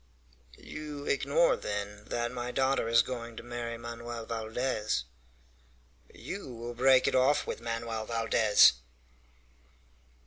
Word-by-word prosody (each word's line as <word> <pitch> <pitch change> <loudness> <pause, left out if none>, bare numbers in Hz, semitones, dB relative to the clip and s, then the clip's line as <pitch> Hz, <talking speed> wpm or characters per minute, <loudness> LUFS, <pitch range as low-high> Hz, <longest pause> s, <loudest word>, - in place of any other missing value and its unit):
"You 150 -2 -8
ignore, - - +3
then, 105 0 -5
that 120 0 -2
my 125 -1 -4
daughter 130 -2 +1
is 115 0 +5
going 120 -2 -6
to - - -7
marry 120 -1 -5
Manoel 115 0 -7
Valdez?" 110 - -2 1.1
"You 195 -9 -7
will 120 +1 -6
break 130 +2 +5
it - - +1
off 130 +3 +3
with - - -5
Manoel 115 -1 -4
Valdez!" 115 -2 +5
120 Hz, 115 wpm, -30 LUFS, 115-130 Hz, 1.1 s, is